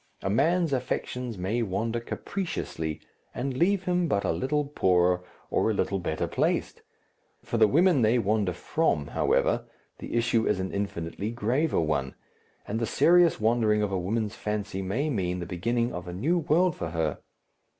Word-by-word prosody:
A 95 - 0
man's 160 - +2
affections 125 -2 -3
may 100 +7 -1
wander 115 +3 -1
capriciously 115 - -4 0.3
and 130 +1 -2
leave 190 +6 +2
him 180 -1 +1
but 100 -9 0
a - - +1
little 135 - 0
poorer 90 -9 +2 0.3
or - - +2
a 110 - 0
little 100 0 0
better 85 -3 -2
placed; - - -1 0.6
for 115 - -2
the 110 - +7
women 165 - +4
they 115 +2 +4
wander 105 -3 +1
from, 90 - 0
however, - - +1 0.3
the - - -6
issue 115 -1 +2
is 105 - +1
an 95 0 -3
infinitely 100 0 -3
graver 120 +7 0
one, 70 -4 -1 0.5
and 110 +2 -2
the 115 - -1
serious 175 +5 +4
wandering 110 -1 +2
of 105 - -1
a 95 - 0
woman's 105 +3 -1
fancy 105 -2 -3
may 115 +11 -1
mean 90 -6 -1
the 90 - -4
beginning 115 +8 -1
of 90 0 -6
a 90 - -5
new 155 - +1
world 170 +2 +2
for 85 - -4
her. 80 -2 -1
110 Hz, 170 wpm, -27 LUFS, 95-135 Hz, 0.6 s, the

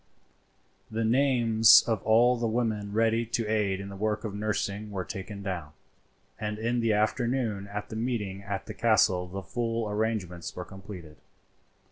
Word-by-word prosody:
The 110 +1 -1
names 115 -3 +6
of 110 -4 0
all 120 +3 +4
the 120 -1 -1
women 110 -3 -1
ready 115 +2 +2
to 115 0 -2
aid 105 -3 0
in 100 0 -6
the 100 - -8
work 105 +2 -1
of 110 -3 -4
nursing 105 0 -2
were 95 -3 -4
taken 100 +2 -7
down, 85 -6 -4 0.7
and 105 0 -3
in 115 +2 0
the 115 -1 +2
afternoon 110 -1 0
at 105 +1 -6
the - - -6
meeting 110 -5 -2
at 100 -1 -4
the 110 - -7
castle 110 -6 +3
the 95 +2 -6
full 115 +3 -2
arrangements 105 -5 -2
were 90 - -5
completed. 95 -6 -10
105 Hz, 160 wpm, -28 LUFS, 100-115 Hz, 0.7 s, names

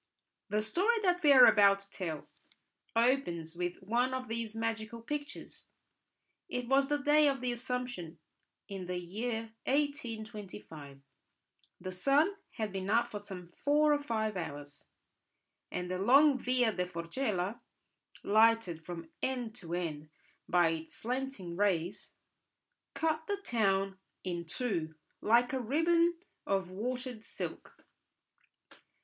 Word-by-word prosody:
The 210 +1 +1
story 375 - +2
that 355 -2 +2
we 295 -3 +6
are 255 -3 +10
about 200 -1 +6
to 195 - -16
tell 165 -5 -4 0.7
opens 225 -10 +1
with 175 0 -2
one 245 +6 +1
of 255 0 -4
these 225 -1 -3
magical 225 0 -3
pictures. 290 +5 -6 0.8
It 250 -1 -3
was 270 +2 +3
the 295 - +2
Day 295 +1 +4
of 275 -1 +1
the 250 0 -1
Assumption 240 -8 -4 0.5
in 190 -2 -6
the 180 0 -2
year 220 +6 -3
1825; 215 - -3 0.8
the 185 +1 -5
sun 275 - +3 0.2
had 215 -3 -3
been 190 0 -4
up 235 +3 +3
some 180 -4 -8
four 295 +9 +3
or 290 - +1
five 220 -5 -1
hours, 145 -4 -7 0.8
and 180 0 -4
the 185 - -2
long 275 +8 +6
Via 250 -2 +2
da 180 -1 -1
Forcella, 180 +4 -2 0.6
lighted 215 -6 +3
from 165 -2 -7
end 250 -4 -2
to 175 -5 -5
end 155 -4 -4 0.4
by 175 -2 +5
its 160 0 -5
slanting 250 -7 -4
rays, 190 -1 0 0.8
cut 315 0 0
the 405 - 0
town 195 - 0 0.2
in 175 -2 -3
two, 165 -5 -2 0.3
like 240 +4 +4
a 265 - 0
ribbon 335 +7 +3 0.3
of 190 -2 0
watered 245 +3 -4
silk. - - -7
220 Hz, 130 wpm, -32 LUFS, 180-260 Hz, 0.8 s, are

